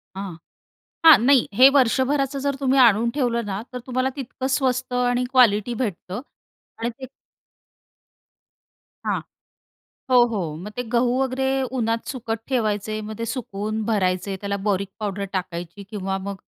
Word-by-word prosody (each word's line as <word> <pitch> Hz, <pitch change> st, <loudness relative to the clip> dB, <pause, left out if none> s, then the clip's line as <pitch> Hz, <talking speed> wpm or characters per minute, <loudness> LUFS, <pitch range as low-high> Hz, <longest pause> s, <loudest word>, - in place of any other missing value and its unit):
हां, 195 Hz, -3 st, -6 dB, 0.7 s
हां, 320 Hz, -2 st, +11 dB
नाही. 275 Hz, -3 st, +5 dB
हे 255 Hz, +6 st, +8 dB
वर्षभराचं 275 Hz, +2 st, +2 dB
जर 280 Hz, 0 st, 0 dB
तुम्ही 270 Hz, 0 st, +2 dB
आणून 235 Hz, -1 st, +5 dB
ठेवलं 240 Hz, -4 st, 0 dB
ना, 195 Hz, 0 st, -3 dB
तर 250 Hz, -, -4 dB
तुम्हाला 255 Hz, 0 st, 0 dB
तितकं 260 Hz, -1 st, -5 dB
स्वस्त 255 Hz, -2 st, -1 dB
आणि 245 Hz, 0 st, +1 dB
क्वालिटी 240 Hz, -3 st, +4 dB
भेटतं 195 Hz, -1 st, -4 dB, 0.6 s
आणि 235 Hz, +1 st, -2 dB
ते 260 Hz, -, -6 dB, 2.0 s
हां, -, -, 0 dB, 0.9 s
हो, -, -, +7 dB, 0.2 s
हो, 205 Hz, -, -1 dB, 0.2 s
मग 210 Hz, -, -7 dB
ते 245 Hz, +4 st, -3 dB
गहू 240 Hz, +1 st, +3 dB
वगैरे 265 Hz, 0 st, 0 dB, 0.3 s
उन्हात 230 Hz, 0 st, -1 dB
सुकत 225 Hz, -4 st, -4 dB
ठेवायचे. 215 Hz, -3 st, -1 dB
मग 215 Hz, -, -7 dB
ते -, -, -1 dB
सुकवून 215 Hz, -2 st, -3 dB
भरायचे. 195 Hz, -3 st, 0 dB
त्याला 200 Hz, 0 st, -2 dB
बोरिक 200 Hz, -1 st, 0 dB
पावडर 200 Hz, -1 st, -3 dB
टाकायची 175 Hz, +1 st, -5 dB
किंवा 195 Hz, -1 st, -2 dB
मग 200 Hz, -, -4 dB
230 Hz, 140 wpm, -23 LUFS, 200-255 Hz, 2.0 s, हां